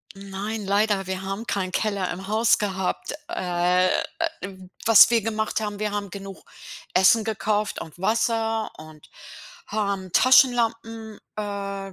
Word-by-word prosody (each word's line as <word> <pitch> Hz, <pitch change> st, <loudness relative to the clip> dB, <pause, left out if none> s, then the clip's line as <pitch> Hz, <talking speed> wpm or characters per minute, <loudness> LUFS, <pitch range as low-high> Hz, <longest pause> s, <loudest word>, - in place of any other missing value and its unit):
Nein, 200 Hz, +2 st, -5 dB
leider. 200 Hz, -1 st, +1 dB
Wir 190 Hz, 0 st, -4 dB
haben 195 Hz, +4 st, -5 dB
keinen 185 Hz, -3 st, -2 dB
Keller 200 Hz, -4 st, -1 dB
im 190 Hz, +2 st, -7 dB
Haus 220 Hz, +2 st, +3 dB
gehabt. 190 Hz, +5 st, -2 dB
Äh, 180 Hz, 0 st, +1 dB, 0.5 s
w 185 Hz, -1 st, -9 dB, 0.2 s
was 225 Hz, -1 st, +8 dB
wir 230 Hz, -3 st, +3 dB
gemacht 220 Hz, 0 st, -1 dB
haben: 210 Hz, -1 st, -4 dB
Wir 210 Hz, 0 st, -1 dB
haben 200 Hz, -2 st, -3 dB
genug 195 Hz, 0 st, -9 dB, 0.5 s
Essen 190 Hz, +4 st, +5 dB
gekauft 215 Hz, -1 st, -1 dB
und 160 Hz, +1 st, -10 dB
Wasser 225 Hz, +2 st, 0 dB
und 155 Hz, -1 st, -13 dB, 0.6 s
haben 200 Hz, -3 st, -2 dB
Taschenlampen, 230 Hz, -3 st, +3 dB, 0.2 s
äh, 200 Hz, -2 st, -5 dB
200 Hz, 130 wpm, -24 LUFS, 190-220 Hz, 0.6 s, was